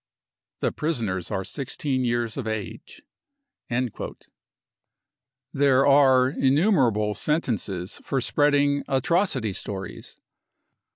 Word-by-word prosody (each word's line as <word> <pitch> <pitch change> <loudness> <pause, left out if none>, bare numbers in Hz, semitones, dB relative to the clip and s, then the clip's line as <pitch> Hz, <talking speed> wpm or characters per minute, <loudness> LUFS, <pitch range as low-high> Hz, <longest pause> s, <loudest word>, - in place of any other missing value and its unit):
The - - +1
prisoners 110 - -2
are 95 - -2
16 135 +3 -3
years 120 -2 -1
of 130 -4 -4
age. 110 - -6 0.7
55 125 -2 -3 1.4
There 135 -1 +3
are 135 -2 +5
innumerable 130 - +2
sentences 105 - -2
for 135 - -1
spreading 145 +2 +2
44 135 - 0
atro 175 +9 +2
city 110 - -2
stories." 95 0 -6
130 Hz, 100 wpm, -25 LUFS, 110-145 Hz, 1.4 s, are